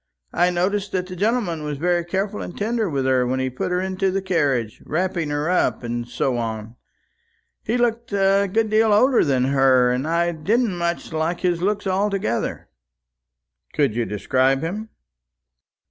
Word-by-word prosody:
I 175 Hz, +1 st, +3 dB
noticed 190 Hz, +3 st, -1 dB
that 185 Hz, -1 st, 0 dB
the 185 Hz, 0 st, -8 dB
gentleman 205 Hz, -4 st, 0 dB
was 150 Hz, -1 st, -4 dB
very 175 Hz, +3 st, +1 dB
careful 195 Hz, +4 st, -2 dB
and -, -, -7 dB
tender 220 Hz, -1 st, -1 dB
with 135 Hz, -3 st, -1 dB
her 130 Hz, -1 st, +2 dB
when 130 Hz, +1 st, -1 dB
he 130 Hz, 0 st, -1 dB
put 130 Hz, -, -3 dB
her 180 Hz, 0 st, 0 dB
into 190 Hz, +1 st, -1 dB
the 190 Hz, +1 st, 0 dB
carriage, 145 Hz, -, -1 dB
wrapping 170 Hz, -1 st, -1 dB
her 145 Hz, +1 st, -1 dB
up, 180 Hz, -7 st, +1 dB
and 120 Hz, 0 st, -3 dB
so 120 Hz, +1 st, -1 dB
on. 110 Hz, -1 st, -4 dB, 0.9 s
He 230 Hz, +3 st, -1 dB
looked 235 Hz, 0 st, 0 dB
a 195 Hz, 0 st, +2 dB
good 220 Hz, +1 st, +1 dB
deal 215 Hz, 0 st, +4 dB
older 250 Hz, +4 st, +4 dB
than 130 Hz, -3 st, +1 dB
her, 130 Hz, -2 st, +4 dB
and 130 Hz, +4 st, -1 dB
I 170 Hz, +1 st, +1 dB
didn't 200 Hz, +6 st, 0 dB
much 170 Hz, -1 st, -3 dB
like 160 Hz, +2 st, -1 dB
his 175 Hz, -2 st, 0 dB
looks 205 Hz, +2 st, 0 dB
altogether." 190 Hz, -, -1 dB, 1.1 s
"Could 140 Hz, -7 st, +1 dB
you 120 Hz, -1 st, 0 dB
describe 130 Hz, +6 st, +1 dB
him?" 210 Hz, +7 st, -4 dB
175 Hz, 170 wpm, -22 LUFS, 135-200 Hz, 1.1 s, deal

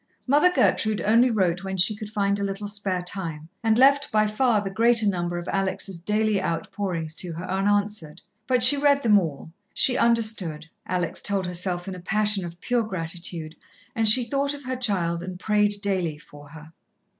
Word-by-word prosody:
Mother 295 Hz, +7 st, +4 dB
Gertrude 215 Hz, -, +1 dB
only 230 Hz, +4 st, +4 dB
wrote 185 Hz, -5 st, 0 dB
when 190 Hz, 0 st, -4 dB
she 195 Hz, +4 st, +3 dB
could 210 Hz, 0 st, -8 dB
find 200 Hz, -1 st, 0 dB
a -, -, -2 dB
little 200 Hz, +1 st, -4 dB
spare 200 Hz, -3 st, -3 dB
time, 165 Hz, -4 st, -4 dB
and 225 Hz, -1 st, +2 dB
left 275 Hz, +2 st, +4 dB
by 215 Hz, 0 st, +3 dB
far 215 Hz, +1 st, +1 dB
the 195 Hz, -1 st, -4 dB
greater 230 Hz, +2 st, +3 dB
number 175 Hz, -3 st, -1 dB
of 175 Hz, -, -6 dB
Alex' 195 Hz, 0 st, -2 dB
daily 210 Hz, +3 st, 0 dB
outpourings 165 Hz, -1 st, -3 dB
to 175 Hz, -2 st, -5 dB
her 170 Hz, +3 st, -6 dB
unanswered, 195 Hz, -3 st, -1 dB, 0.3 s
but 250 Hz, -2 st, +2 dB
she 285 Hz, +4 st, +8 dB
read 280 Hz, 0 st, +2 dB
them 210 Hz, -3 st, +5 dB
all 160 Hz, -2 st, -6 dB, 0.2 s
she 250 Hz, -, +3 dB
understood, 215 Hz, -10 st, 0 dB, 0.2 s
Alex 180 Hz, -2 st, -2 dB
told 200 Hz, -2 st, -1 dB
herself 180 Hz, 0 st, -3 dB
in 190 Hz, -, -4 dB
a 180 Hz, -, -8 dB
passion 210 Hz, +1 st, 0 dB
of 170 Hz, 0 st, -8 dB
pure 245 Hz, -1 st, 0 dB
gratitude 170 Hz, -4 st, -6 dB, 0.4 s
and 225 Hz, -2 st, +4 dB
she 245 Hz, +4 st, +6 dB
thought 280 Hz, +4 st, -1 dB
of 285 Hz, -, -11 dB
her 255 Hz, 0 st, -3 dB
child 185 Hz, -9 st, -1 dB
and 180 Hz, 0 st, -7 dB
prayed 210 Hz, 0 st, +1 dB
daily 180 Hz, -6 st, -1 dB
for 145 Hz, -1 st, -15 dB
her. 160 Hz, +1 st, -13 dB
200 Hz, 185 wpm, -24 LUFS, 175-220 Hz, 0.4 s, she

